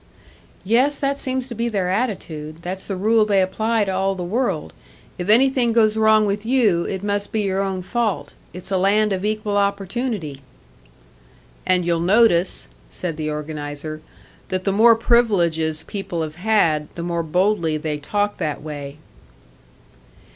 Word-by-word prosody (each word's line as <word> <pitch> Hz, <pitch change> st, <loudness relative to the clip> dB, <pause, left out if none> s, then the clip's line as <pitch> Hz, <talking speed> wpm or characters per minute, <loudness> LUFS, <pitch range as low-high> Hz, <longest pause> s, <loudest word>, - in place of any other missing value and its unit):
"Yes, 255 Hz, +8 st, +3 dB
that 280 Hz, 0 st, -1 dB
seems 260 Hz, -1 st, -2 dB
to -, -, -5 dB
be 235 Hz, +1 st, -1 dB
their 195 Hz, -5 st, -1 dB
attitude. 170 Hz, -7 st, -3 dB
That's 185 Hz, +2 st, -4 dB
the 195 Hz, -, -2 dB
rule 215 Hz, +4 st, +3 dB
they 205 Hz, -2 st, +2 dB
apply 215 Hz, +4 st, +1 dB
to 190 Hz, -, -2 dB
all 195 Hz, +1 st, 0 dB
the 180 Hz, -, -4 dB
world 180 Hz, -, -2 dB, 0.5 s
if 180 Hz, +3 st, -4 dB
anything 245 Hz, +1 st, +4 dB
goes 220 Hz, -2 st, +3 dB
wrong 220 Hz, -1 st, +4 dB
with 205 Hz, 0 st, -1 dB
you, 220 Hz, -8 st, +2 dB
it 190 Hz, 0 st, -4 dB
must 205 Hz, 0 st, -1 dB
be 220 Hz, -, 0 dB
your 195 Hz, -1 st, 0 dB
own 190 Hz, -2 st, -2 dB
fault. 230 Hz, +1 st, -2 dB, 0.2 s
It's 180 Hz, +2 st, -8 dB
a 190 Hz, -, +2 dB
land 205 Hz, +2 st, +3 dB
of 185 Hz, 0 st, -3 dB
equal 210 Hz, -1 st, -1 dB
opportunity." 200 Hz, -, -2 dB, 1.3 s
"And 180 Hz, -1 st, +3 dB
you'll 170 Hz, -1 st, +1 dB
notice," 185 Hz, 0 st, +3 dB, 0.2 s
said 165 Hz, -, -4 dB
the 155 Hz, 0 st, -3 dB
organiser, 150 Hz, 0 st, -5 dB, 0.5 s
"that 185 Hz, -1 st, -2 dB
the 195 Hz, -, +1 dB
more 230 Hz, +3 st, +6 dB
privileges 170 Hz, -10 st, +2 dB
people 180 Hz, -5 st, -4 dB
have 155 Hz, +1 st, -7 dB
had, 175 Hz, -7 st, +2 dB
the 170 Hz, -, -5 dB
more 170 Hz, -1 st, -1 dB
boldly 170 Hz, -1 st, +1 dB
they 150 Hz, -1 st, -3 dB
talk 205 Hz, +7 st, -1 dB
that 150 Hz, -4 st, -3 dB
way." 145 Hz, -2 st, -7 dB
195 Hz, 160 wpm, -21 LUFS, 170-220 Hz, 1.3 s, more